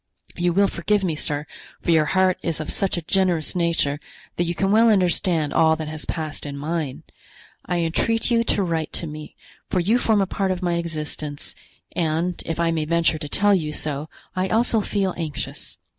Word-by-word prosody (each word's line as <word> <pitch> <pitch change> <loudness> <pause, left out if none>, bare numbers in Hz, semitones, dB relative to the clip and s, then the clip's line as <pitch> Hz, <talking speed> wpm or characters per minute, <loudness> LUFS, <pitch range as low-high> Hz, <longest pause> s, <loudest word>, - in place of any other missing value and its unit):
You 175 0 +1
will 200 +3 +4
forgive 200 +3 0
me, 170 -4 0
sir, 150 -1 -2 0.3
for - - 0
your 160 -2 +5
heart 185 +2 +2
is 165 -2 -2
of 155 - -3
such 195 -3 0
a 170 - -3
generous 180 -2 +1
nature 165 -4 +1 0.4
that 175 - 0
you 170 +1 -2
can 195 +2 +1
well 225 +2 +6
understand 175 -5 +3
all 160 0 +5
that 155 -1 -5
has 155 0 -5
passed 155 -2 -4
in 140 -1 -5
mine. 155 -2 -3 0.6
I 175 -1 0
entreat 225 +9 +1
you 230 -1 +4
to 205 - +2
write 165 -3 -1
to - - -2
me, 150 -1 -8 0.3
for 185 - +1
you 215 +8 +3
form 220 -3 +3
a 195 - +3
part 195 0 -1
of 185 0 -2
my 175 -1 +1
existence, 155 -3 -5 0.4
and, 165 +1 0
if 165 0 -2
I 170 -1 +2
may 160 -2 0
venture 165 0 +2
to 150 -2 -6
tell 205 +5 +3
you 160 -6 +1
so, 150 0 -3 0.3
I 185 +1 +1
also 225 0 +3
feel 195 -2 0
anxious. 160 -4 -5
170 Hz, 200 wpm, -23 LUFS, 155-190 Hz, 0.6 s, well